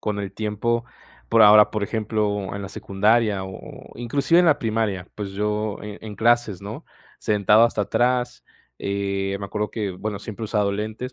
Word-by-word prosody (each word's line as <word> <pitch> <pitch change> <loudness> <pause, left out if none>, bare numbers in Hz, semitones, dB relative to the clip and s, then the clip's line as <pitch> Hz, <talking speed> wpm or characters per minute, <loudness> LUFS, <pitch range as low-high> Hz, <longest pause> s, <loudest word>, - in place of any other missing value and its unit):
con 105 -1 -2
el 95 -2 -5
tiempo 110 +3 -1 0.4
por 115 -1 +5
ahora, 105 0 +8
por 105 -2 -2
ejemplo, 105 -3 -2
en 100 - -5
la 95 - -6
secundaria 105 0 +1
o 95 - -7 0.4
o - - -14
inclusive 140 +8 +2
en 180 - +3
la 155 -3 +4
primaria, 110 -5 -1
pues 105 -2 -5
yo 105 +1 -2
en 105 -1 -7
en 105 -2 -8
clases, 115 -4 +2
¿no?, 105 +2 -7 0.3
sentado 105 +1 +4
hasta 115 -3 0
atrás, 125 +3 0 0.4
eh, 100 0 -2
me - - -4
acuerdo 105 +1 -3
que, 105 -3 -3
bueno, 105 +2 -5
siempre 110 +2 -7
he - - -3
usado 105 -2 +1
lentes 110 +5 -4
105 Hz, 185 wpm, -23 LUFS, 100-115 Hz, 0.4 s, ahora